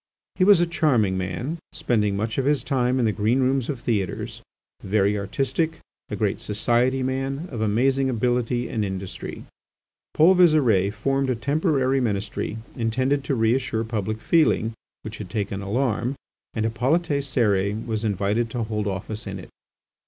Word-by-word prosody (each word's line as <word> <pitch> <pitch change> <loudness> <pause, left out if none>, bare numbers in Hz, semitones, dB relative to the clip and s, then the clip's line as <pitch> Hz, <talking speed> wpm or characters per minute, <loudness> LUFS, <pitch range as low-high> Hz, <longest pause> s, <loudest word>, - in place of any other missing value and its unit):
He 185 - +1
was 200 -2 +7
a 175 - +4
charming 130 - +2
man, 105 - -3
spending 105 -4 0
much 110 +4 -2
of 130 - 0
his 145 0 +2
time 130 -2 +1
in 125 - +2
the 110 - +3
green 110 +5 +1
rooms 130 -1 +1
of 135 -5 -3
theatres, 105 -7 -2 0.4
very 100 +1 +1
artistic, 135 - -1 0.3
a - - -3
great - - -1
society 120 +5 +1
man, 135 +5 -2
of 115 -4 -4
amazing 130 +5 +2
ability 120 0 0
and 110 -2 -2
industry. 95 -1 -5 0.7
Paul 165 +5 +6
Visire 140 - +4
formed 135 +5 0
a 130 - +1
temporary 135 - +1
ministry 105 -1 -2 0.2
intended 130 +4 0
to 135 - 0
reassure 115 0 +1
public 110 -1 -3
feeling 115 -7 +2 0.3
which 110 0 -7
had 100 -4 -7
taken 100 0 -3
alarm, 120 +4 -1 0.4
and 110 -1 0
Hippolyte 125 +10 +1 0.2
Cérès 105 -5 0
was 110 -2 -2
invited 105 +2 0
to 115 +1 -2
hold 105 -1 -2
office 105 +3 -4
in 100 0 -5
it. 90 - -10
115 Hz, 155 wpm, -24 LUFS, 105-135 Hz, 0.7 s, was